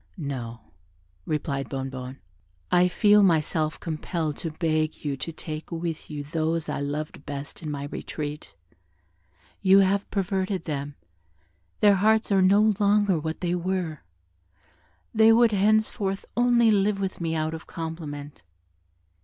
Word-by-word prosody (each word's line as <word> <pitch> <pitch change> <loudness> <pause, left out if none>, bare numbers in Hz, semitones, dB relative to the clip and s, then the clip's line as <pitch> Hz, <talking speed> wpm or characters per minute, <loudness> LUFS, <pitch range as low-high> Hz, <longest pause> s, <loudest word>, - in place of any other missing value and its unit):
"No," 125 - -5 0.7
replied 140 -3 -2
Bonnebonne, 130 -1 -5 0.5
"I 180 0 +5
feel 210 +3 +5
myself 160 -3 +2
compelled 160 -1 -3
to 165 - -4
beg 155 -1 -1
you 140 -2 -1
to 165 - -4
take 155 0 -7
with 165 -1 -4
you 150 -2 -5
those 160 +1 -1
I - - -2
loved 145 +1 -4
best 140 +3 -7
in 155 - -5
my 145 -1 -4
retreat; 150 +1 -6 1.1
you 195 0 +6
have 195 +1 +1
perverted 190 -1 -1
them, 145 -2 -4 0.9
their 205 -2 +6
hearts 220 +2 +3
are 195 -1 +4
no 205 +3 +5
longer 205 -3 +3
what 160 +1 -4
they 175 -1 0
were: 180 -3 -2 1.1
they 220 0 +6
would 230 0 +5
henceforth 205 -1 +1
only 240 -1 +4
live 200 0 +2
with 190 -2 -3
me 165 -1 -1
out 155 0 -1
of 160 - -8
compliment. 150 -3 -6
165 Hz, 135 wpm, -26 LUFS, 150-195 Hz, 1.1 s, you